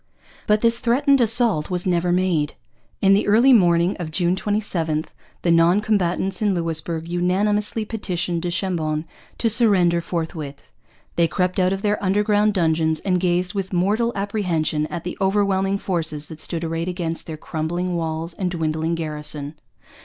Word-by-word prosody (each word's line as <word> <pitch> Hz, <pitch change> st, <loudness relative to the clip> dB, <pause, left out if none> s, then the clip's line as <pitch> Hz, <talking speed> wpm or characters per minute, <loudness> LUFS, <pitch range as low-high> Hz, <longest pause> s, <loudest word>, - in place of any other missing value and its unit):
But 210 Hz, 0 st, +3 dB
this 230 Hz, 0 st, +2 dB
threatened 275 Hz, +3 st, +3 dB
assault 225 Hz, -8 st, +3 dB
was 180 Hz, -1 st, -2 dB
never 175 Hz, -1 st, +1 dB
made. 175 Hz, -5 st, 0 dB, 0.5 s
In 195 Hz, 0 st, +6 dB
the 200 Hz, -, +2 dB
early 235 Hz, +6 st, +5 dB
morning 175 Hz, -3 st, +3 dB
of 170 Hz, -3 st, -4 dB
June 175 Hz, +2 st, 0 dB
27 175 Hz, -7 st, -1 dB, 0.4 s
the 170 Hz, -, +2 dB
non 170 Hz, +3 st, +4 dB
combatants 195 Hz, -2 st, -1 dB
in 205 Hz, -3 st, +2 dB
Louisbourg 165 Hz, -1 st, -2 dB
unanimously 205 Hz, +6 st, 0 dB
petitioned 180 Hz, -6 st, -3 dB
du 175 Hz, -, -2 dB
Chambon 165 Hz, -4 st, -2 dB, 0.3 s
to 235 Hz, -, 0 dB
surrender 195 Hz, -7 st, +4 dB
forthwith. 160 Hz, -4 st, -5 dB, 0.5 s
They 170 Hz, -1 st, +4 dB
crept 180 Hz, +2 st, -1 dB
out 185 Hz, 0 st, +2 dB
of 195 Hz, 0 st, -3 dB
their 210 Hz, 0 st, 0 dB
underground 210 Hz, +2 st, +2 dB
dungeons 160 Hz, -2 st, +1 dB
and 180 Hz, -2 st, 0 dB
gazed 180 Hz, +2 st, 0 dB
with 195 Hz, -2 st, -3 dB
mortal 210 Hz, +6 st, +1 dB
apprehension 180 Hz, -7 st, -1 dB
at 170 Hz, 0 st, -6 dB
the 180 Hz, -, -6 dB
overwhelming 195 Hz, 0 st, +1 dB
forces 160 Hz, -6 st, -2 dB
that 160 Hz, -1 st, -7 dB
stood 170 Hz, 0 st, -3 dB
arrayed 165 Hz, +1 st, -3 dB
against 170 Hz, -2 st, -3 dB
their 160 Hz, -2 st, -6 dB
crumbling 175 Hz, +4 st, -3 dB
walls 165 Hz, 0 st, -3 dB
and 185 Hz, 0 st, -2 dB
dwindling 160 Hz, -1 st, -1 dB
garrison. 150 Hz, -2 st, -4 dB
180 Hz, 155 wpm, -22 LUFS, 165-200 Hz, 0.5 s, In